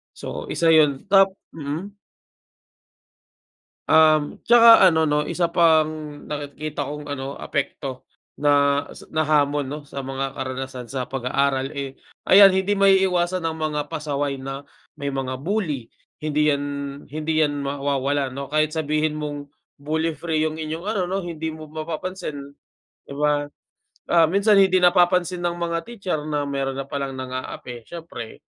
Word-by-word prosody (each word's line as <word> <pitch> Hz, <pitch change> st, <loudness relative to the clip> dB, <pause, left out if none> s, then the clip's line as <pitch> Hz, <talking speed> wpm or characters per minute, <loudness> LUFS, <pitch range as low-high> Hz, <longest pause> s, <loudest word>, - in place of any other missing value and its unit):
So -, -, -6 dB
isa 165 Hz, -2 st, +2 dB
yun, 150 Hz, -4 st, +4 dB
tap 195 Hz, -1 st, +7 dB, 0.2 s
mm? 165 Hz, +7 st, -6 dB, 1.9 s
Um, 155 Hz, -2 st, +4 dB
tsaka 230 Hz, -2 st, +8 dB
ano 160 Hz, -1 st, +2 dB
'no, 150 Hz, 0 st, +1 dB
isa 170 Hz, +2 st, 0 dB
pang 165 Hz, -2 st, +4 dB, 0.4 s
nakikita 145 Hz, 0 st, -4 dB
kong 145 Hz, +1 st, -7 dB
ano, 140 Hz, -1 st, -5 dB
apekto 135 Hz, -2 st, -4 dB, 0.3 s
na 145 Hz, -1 st, +3 dB
s -, -, -13 dB
na 155 Hz, -, 0 dB
hamon 145 Hz, -1 st, +2 dB
'no, 150 Hz, -, -4 dB
sa 140 Hz, -1 st, -6 dB
mga 135 Hz, 0 st, -4 dB
karanasan 130 Hz, -2 st, -5 dB
sa 130 Hz, -2 st, -3 dB
pag-aaral, 135 Hz, +1 st, 0 dB
eh, 140 Hz, -2 st, -5 dB, 0.3 s
ayan, 195 Hz, 0 st, +9 dB
hindi 190 Hz, +2 st, +1 dB
maiiwasan 185 Hz, -3 st, +3 dB
ang 160 Hz, -, -3 dB
mga 155 Hz, -2 st, -2 dB
pasaway 145 Hz, -3 st, -2 dB
na, 135 Hz, +1 st, -6 dB, 0.3 s
may 140 Hz, -, -3 dB
mga 135 Hz, -2 st, -3 dB
bully. 155 Hz, -, -2 dB, 0.3 s
Hindi 150 Hz, 0 st, +1 dB
'yan 140 Hz, 0 st, -1 dB, 0.4 s
hindi 155 Hz, +2 st, -2 dB
'yan 145 Hz, -2 st, +1 dB
mawawala 140 Hz, 0 st, -1 dB
'no. 135 Hz, +2 st, -7 dB
Kahit 155 Hz, +1 st, +1 dB
sabihin 155 Hz, 0 st, 0 dB
mong 145 Hz, -1 st, -5 dB, 0.3 s
bully 160 Hz, +3 st, -1 dB
free 160 Hz, -2 st, 0 dB
'yong 155 Hz, 0 st, -2 dB
inyong 160 Hz, +2 st, -4 dB
ano 200 Hz, -3 st, -1 dB
'no, 190 Hz, +1 st, -2 dB
hindi 160 Hz, -2 st, -5 dB
mo 155 Hz, -, -10 dB
mapapansin, 160 Hz, +2 st, -5 dB, 0.7 s
'di -, -, -11 dB
ba? 145 Hz, +1 st, +1 dB, 0.6 s
Ah, 165 Hz, -2 st, +4 dB
minsan 200 Hz, +3 st, +4 dB
hindi 190 Hz, -2 st, +5 dB
napapansin 180 Hz, 0 st, +3 dB
ng 175 Hz, 0 st, -1 dB
mga 170 Hz, -1 st, -1 dB
teacher 195 Hz, -9 st, -4 dB
na 145 Hz, -1 st, -1 dB
meron 135 Hz, -1 st, -2 dB
na -, -, -1 dB
palang 140 Hz, -1 st, -4 dB
nang-aapi. 130 Hz, -2 st, -7 dB
Siyempre, 165 Hz, -9 st, -9 dB
150 Hz, 145 wpm, -23 LUFS, 140-170 Hz, 1.9 s, ayan